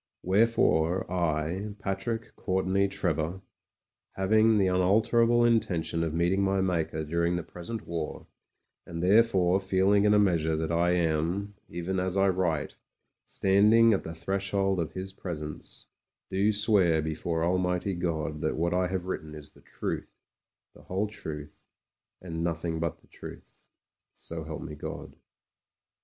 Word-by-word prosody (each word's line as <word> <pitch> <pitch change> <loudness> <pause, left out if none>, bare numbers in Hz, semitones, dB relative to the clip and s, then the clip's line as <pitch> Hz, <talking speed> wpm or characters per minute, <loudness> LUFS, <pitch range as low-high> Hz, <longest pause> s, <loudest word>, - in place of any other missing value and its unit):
Wherefore 95 -4 +2
I, 85 +4 -1
Patrick 105 +4 -4
Courtenay 95 +1 +1
Trevor, 90 -2 -2 0.7
having 110 +3 +3
the 100 - +3
unalterable 110 +6 +3
intention 100 -8 +1
of 80 - -1
meeting 85 +4 +1
my 95 0 +1
Maker 85 -4 -1
during 85 +3 0
the 85 - -2
present 90 +7 -7
war, 85 -2 -5 0.6
and 85 0 -6
therefore 95 -2 +4
feeling 95 +1 +2
in 105 0 +5
a - - +5
measure 85 -6 +2
that 80 +1 -2
I 85 +1 +2
am, 85 +4 0 0.2
even 85 +2 -3
as 95 +1 -1
I 95 0 +4
write, 85 -5 -1 0.5
standing 105 +4 +4
at 95 - +1
the 80 - -7
threshold 95 +2 -1
of 80 -2 -3
His 95 +1 -6
Presence, 75 -6 -7 0.5
do 100 +3 +2
swear 100 -7 +3
before 80 +1 -2
Almighty 90 +2 0
God 80 -4 -2
that 80 - 0
what 85 +2 0
I 90 0 +1
have 90 -1 -3
written 80 -4 -5
is 75 -1 -10
the - - -21
truth, - - -5 0.6
the - - -16
whde 100 +3 -2
truth, 75 -7 -8 0.6
and 85 -2 -5
nothing 85 -1 -1
but 85 0 -3
the - - -25
truth. - - -12 0.5
So 80 -1 -7
help 80 -1 -6
me, 80 - -7
God. 75 - -7
90 Hz, 145 wpm, -28 LUFS, 80-100 Hz, 0.7 s, in